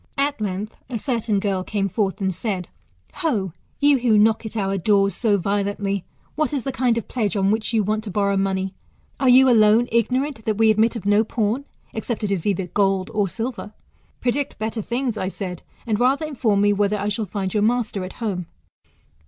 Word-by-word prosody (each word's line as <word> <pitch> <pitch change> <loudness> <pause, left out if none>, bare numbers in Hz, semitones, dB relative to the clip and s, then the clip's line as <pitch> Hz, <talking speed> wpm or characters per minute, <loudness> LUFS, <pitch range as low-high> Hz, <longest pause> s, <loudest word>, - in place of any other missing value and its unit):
At 280 -3 0
length, 205 +1 -3
a 245 - -2
certain 225 -3 0
girl 195 -2 -1
came 200 0 -1
forth, 195 0 -1
and 190 -1 0
said, 185 -2 -3 0.5
Ho 320 -7 0
1 180 - -8 0.3
you 285 -2 +5
who 235 -3 +3
knock 220 +1 +3
at 220 - -6
our 195 -1 0
doors 200 +1 +2
so 210 0 +2
violently, 200 0 -1 0.3
what 305 0 -1
is 275 -4 -1
the 270 - -2
kind 245 -2 +1
of 230 - -3
pledge 210 -6 -1
on 195 0 +2
which 220 +1 -1
you 220 -2 +2
want 215 +2 -1
to - - -5
borrow 200 +1 +1
money? 190 0 -1 0.5
Are 265 - +3
you 260 +1 +7
alone 225 0 +5
ignorant 250 +2 0
that 215 -2 0
we 220 0 +5
admit 220 +2 +2
of 220 - -6
no 205 +2 +4
pawn, 225 +4 -1 0.3
except 220 0 -4
it 205 - -1
is 195 -1 -1
either 195 -2 0
gold 195 +1 0
or 205 -3 +1
silver? 225 0 -5 0.5
Predict 260 +3 -1
better 220 +1 -3
things, 240 +1 -2
I 185 - -2
said, 185 -2 -5 0.2
and 220 -3 0
rather 270 +5 +2
inform 235 -9 +1
me, 205 0 +4
whether 205 +1 +1
I 200 0 -2
shall 210 +1 -1
find 190 -1 -3
your 210 - +1
master 220 -3 0
at 185 - -7
home 190 -7 -3
215 Hz, 205 wpm, -22 LUFS, 195-235 Hz, 0.5 s, you